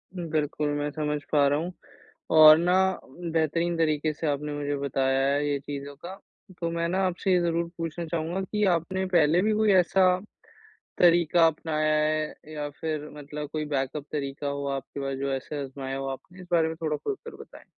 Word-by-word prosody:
बिल्कुल 155 -3 -1
मैं 145 0 -1
समझ 150 0 -2
पा 145 -2 +4
रहा 145 +2 +2
हूँ 175 +3 -4 0.7
और 155 0 +10
ना 175 +2 +2 0.6
बेहतरीन 165 +2 0
तरीक़े 155 -1 +1
से 155 +1 -4
आपने 145 +1 -2
मुझे 145 0 -2
बताया 135 -1 0
है 145 +1 0
ये 145 -1 0
चीज़ों 140 0 -7
का 185 +2 -6 0.4
तो 170 - -1
मैं 170 0 -1
ना 190 +2 0
आपसे 185 +1 -1
ये 180 - +4
ज़रूर 170 0 0
पूछना 165 +1 -4
चाहूँगा 165 +3 -2
कि 210 +2 -2
आपने 185 +3 -2
पहले 165 +1 +4
भी 215 +2 +2
कोई 215 -1 +3
ऐसा 185 0 +4 0.8
तरीक़ा 170 -1 +5
अपनाया 155 -1 0
है? 155 0 -1 0.2
या 150 -1 -3
फिर 155 -2 -3
मतलब 150 +1 -6
कोई 155 -1 -2
बैकअप 140 0 -2
तरीक़ा 140 -1 -3
हो 140 0 -3
आपके 135 +1 -5
पास 135 -1 -3
जो 140 0 -2
ऐसे 140 +2 -4
अज़माया 135 0 -5
हो 135 - -4
आपने? 175 +7 -8
इस 180 - -11
बारे 165 -1 +4
में 160 - -5
थोड़ा 155 -2 0
खुलकर 425 - -6
बताएँ। - - -13
155 Hz, 185 wpm, -27 LUFS, 145-170 Hz, 0.8 s, और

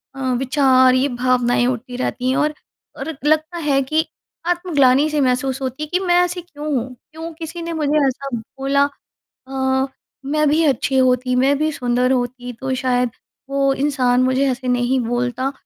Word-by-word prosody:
अ, - - -9 0.2
विचार, 260 -1 +4
ये 260 +2 +2
भावनाएँ 245 -1 +1
उठती 250 0 -3
रहती 255 0 -2
हैं 260 - +1
और 300 0 +1 0.4
और 320 - -5
लगता 310 +3 +1
है 290 -4 +1
कि 310 +4 0 0.4
आत्मग्लानी-सी 305 -4 +2
महसूस 260 +1 0
होती 265 +3 -3
है - - -4
कि 360 - +3
मैं 350 -1 +3
ऐसी 355 0 -3
क्यों 300 -4 -10
हूँ? 255 +1 -3 0.2
क्यों 325 +2 -7
किसी 330 +1 -7
ने 335 0 -4
मुझे 305 -2 +1
ऐसा 275 +1 -3
बोला? 270 +5 0 0.7
अ, 265 0 0 0.4
मैं 305 +2 +1
भी 310 +3 +3
अच्छी 270 -2 +1
होती, 255 0 +2
मैं 270 +3 +3
भी 310 +1 +1
सुंदर 250 -1 +1
होती, 245 0 -2
तो 260 +3 -3
शायद 250 -1 0 0.4
वो 275 0 +2
इंसान 260 -3 +1
मुझे 260 +2 +2
ऐसे 255 0 -4
नहीं 250 +1 +1
बोलता। 245 +3 -1
265 Hz, 170 wpm, -20 LUFS, 250-300 Hz, 0.7 s, विचार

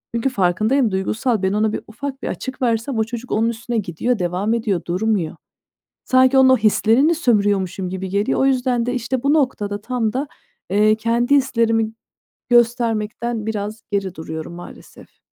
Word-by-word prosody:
Çünkü 235 +3 +1
farkındayım, 215 +4 +1
duygusal 215 +4 -1
ben 190 +1 +1
ona 215 +1 +1
bir - - -3
ufak 270 +5 -7
bir - - -2
açık 260 0 -6
versem 235 +2 0
o - - +3
çocuk 240 +2 -7
onun 225 +2 +2
üstüne 235 +1 -4
gidiyor, 210 +4 -1
devam 180 +5 -1
ediyor, 215 -6 0
durmuyor. 185 -2 -1 0.7
Sanki 260 0 +4
onun 265 0 +7
o 260 - +6
hislerini 225 +8 +3
sömürüyormuşum 200 - +1
gibi 190 0 -4
geliyor. 200 +2 0
O 270 - +3
yüzden 250 -3 +1
de, 245 - -1
işte, 245 +1 -2
bu 280 +2 +3
noktada 210 -9 0
tam 230 -1 -2
da, 275 +3 -2 0.4
eee, 210 +2 +4
kendi 235 +4 +1
hislerimi 230 -4 +1 0.6
göstermekten 235 -1 +1
biraz 215 0 -4
geri 195 -3 -2
duruyorum 160 0 -7
maalesef. 175 - -13
225 Hz, 160 wpm, -20 LUFS, 205-250 Hz, 0.7 s, onun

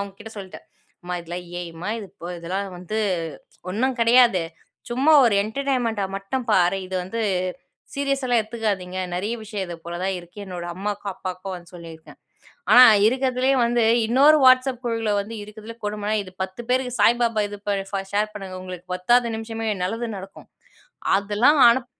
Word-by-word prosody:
அவுங்ககிட்ட 200 +2 -8
சொல்லிட்டேன். 190 -2 -9 0.4
"அம்மா 180 0 -4
இதெல்லாம் 175 +1 -6 0.2
A.I 175 - -5 0.2
மா? - - -3
இது 210 - -7
இப்ப 175 - -8
இதெல்லாம் 190 +4 -3
வந்து 180 +5 -4 0.7
ஒண்ணும் 250 +6 0
கிடையாது. 230 -5 +5 0.5
சும்மா 265 +6 +3
ஒரு 230 -4 +3
என்டர்டெயின்மெண்ட்டா 235 -3 -1
மட்டும் 230 +6 -4
பாரு. 185 -1 +3
இது 190 - -7
வந்து 230 +6 -4 0.7
சீரியஸாலாம் 275 -4 +1
எடுத்துக்காதீங்க. 210 -5 -3 0.2
நிறைய 200 +5 -2
விஷயம் 210 -2 -4
இது 175 -1 -7
போல 170 0 -6
தான் 190 0 -1
இருக்கு." 175 +3 -16
என்னோட 175 -2 -6
அம்மாவுக்கும் 205 +1 -3
அப்பாவுக்கும் 185 +1 -6
வந்து 175 0 -14
சொல்லியிருக்கேன். 165 -2 -12 0.5
ஆனா 250 - +10 0.2
இருக்கறதுலயே 260 +2 +1
வந்து 240 0 +1 0.2
இன்னொரு 275 +7 +6
WhatsApp 255 0 +5
குழுல 225 -2 -1
வந்து 205 +3 -5
இருக்கதுலே 215 +2 -10
கொடுமைனா, 210 0 -2
இது 185 - -12
10 190 +5 -7
பேருக்கு 255 0 +1
சாய்பாபா 230 0 +3
இது 205 0 -8
ப 205 - +2 0.4
ஷேர் 210 +1 0
பண்ணுங்க. 195 -3 -7
உங்களுக்கு 185 -1 -9
10ஆது 240 +6 +3
நிமிஷமே 225 0 -5 0.2
நல்லது 225 +6 -2
நடக்கும். 195 +1 -11 0.7
அதெல்லாம் 210 +9 +3
அனுப் 240 +1 +1
210 Hz, 155 wpm, -23 LUFS, 190-240 Hz, 0.7 s, ஆனா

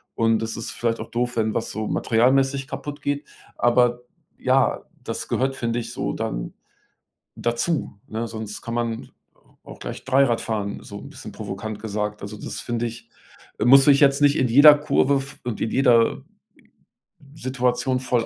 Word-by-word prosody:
und 115 -1 +2
es 115 0 -4
ist 115 - -5
vielleicht 115 -1 -1
auch - - -7
doof, 120 0 -1
wenn 110 -1 +1
was 115 - -2
so 110 0 -3
materialmäßig 135 +3 +2
kaputtgeht, 145 -1 -4 0.3
aber 120 0 +3 0.4
ja, - - +2 0.2
das - - -4
gehört, 135 +1 0
finde 115 0 -1
ich, 120 +1 -6
so - - -2
dann - - -4 0.8
dazu, 120 0 -1
ne? 115 +2 -3
Sonst 110 -2 -7
kann 115 -2 -5
man 115 -1 -3 0.5
auch - - -11
gleich - - -7
Dreirad 130 -2 +3
fahren, 105 -3 -3
so - - -9
'n - - -10
bisschen - - -9
provokant 105 +2 -6
gesagt. 105 -1 -3
Also, 105 +2 -7
das - - -6
finde 120 0 -2
ich 115 0 -8 0.6
muss 135 +3 +7
ich 140 -1 +6
jetzt 140 0 +4
nicht 145 0 +5
in 130 - +2
jeder 145 +5 +9
Kurve 140 -1 +2
f 135 +1 -5
und 120 -3 -4
in 110 - -1
jeder 120 -4 +3 1.1
Situation 130 -1 0
voll 125 -3 0
120 Hz, 165 wpm, -23 LUFS, 115-135 Hz, 1.1 s, jeder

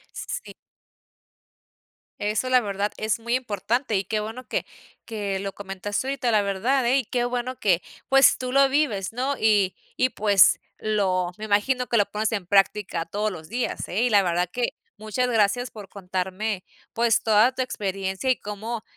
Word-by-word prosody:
S - - -6
s - - -3
sí. - - -10 1.7
Eso, 210 +5 0
la 255 -1 +6
verdad, 205 -1 -2
es 215 +1 -1
muy 235 +2 0
importante, 235 +1 -1
y 190 - +1
qué 215 - -1
bueno 225 +4 -6
que - - -2 0.4
que 205 -4 -3
lo 195 0 -5
comentaste 200 +4 -4
ahorita, 255 -3 0
la 210 -1 +4
verdad, 225 +7 +1
eh. 255 +3 +3
Y 265 - -1
qué 240 +2 -1
bueno 245 +1 -3
que, 180 -4 +3 0.3
pues, 270 0 +6
tú 255 0 -4
lo 275 0 +5
vives, 265 -9 0
¿no? 260 +3 -1
Y 205 -4 +3 0.2
y 255 - +3
pues 205 -3 +5 0.2
lo 190 -4 0
me 215 - -6
imagino 245 +5 +1
que 235 - +1
lo 205 -1 +2
pones 215 +2 -1
en 200 -5 -2
práctica 195 -3 +2
todos 210 +5 -1
los 160 -5 -9
días, 240 +3 -3
eh. 205 +6 -1
Y 245 - +2
la 200 -2 +5
verdad 175 0 0
que 245 -1 0 0.3
muchas 215 +4 -1
gracias 230 +2 +2
por 205 -3 -10
contarme, 190 +1 -3 0.3
pues, 230 -1 +2
toda 220 +3 +4
tu 260 - -1
experiencia, 195 0 -3
y 255 - +3
cómo 215 +2 -5
215 Hz, 185 wpm, -24 LUFS, 195-245 Hz, 1.7 s, la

